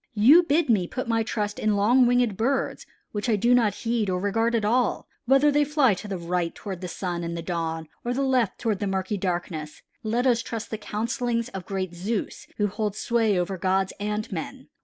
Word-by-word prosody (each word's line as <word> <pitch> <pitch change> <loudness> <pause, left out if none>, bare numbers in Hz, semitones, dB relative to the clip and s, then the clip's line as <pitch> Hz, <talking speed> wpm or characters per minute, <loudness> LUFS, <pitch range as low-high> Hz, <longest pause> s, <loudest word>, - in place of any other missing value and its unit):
You 260 +12 +7
bid 330 -1 +1
me 205 -7 +2
put 255 +5 -4
my 225 -1 +1
trust 210 -2 -2
in 215 -1 +1
long 240 +5 +4
winged 245 -4 +2
birds 260 +7 -1 0.2
which 205 +3 -3
I 220 - +4
do 235 +4 +3
not 230 -4 +3
heed 225 -3 +1
or 180 -1 0
regard 225 +4 +1
at 220 -2 +1
all, 240 +3 +1 0.2
whether 270 +3 +5
they 295 +1 +3
fly 290 -5 +3
to 200 +3 -7
the 195 -2 -3
right 170 0 -2
toward 190 -3 -6
the 180 - -4
sun 175 0 -4
and 170 0 -4
the 165 - -5
dawn, 165 -2 -3 0.2
or 240 - -2
to - - -1
the 275 - +1
left 255 -7 +1
toward 220 -5 -1
the 205 - -1
murky 190 +1 -1
darkness. 175 -5 -4 0.2
Let 235 +2 0
us 245 -2 +3
trust 230 -2 -6
the 220 - -3
counselings 230 +3 -2
of 190 -5 -8
great 190 -3 -3
Zeus 195 +5 -4
who 210 - +2
holds 210 0 -2
sway 225 -5 +1
over 180 +1 -2
gods 190 +1 +1
and 210 +1 -3
men. 160 -5 -6
210 Hz, 220 wpm, -25 LUFS, 185-240 Hz, 0.2 s, You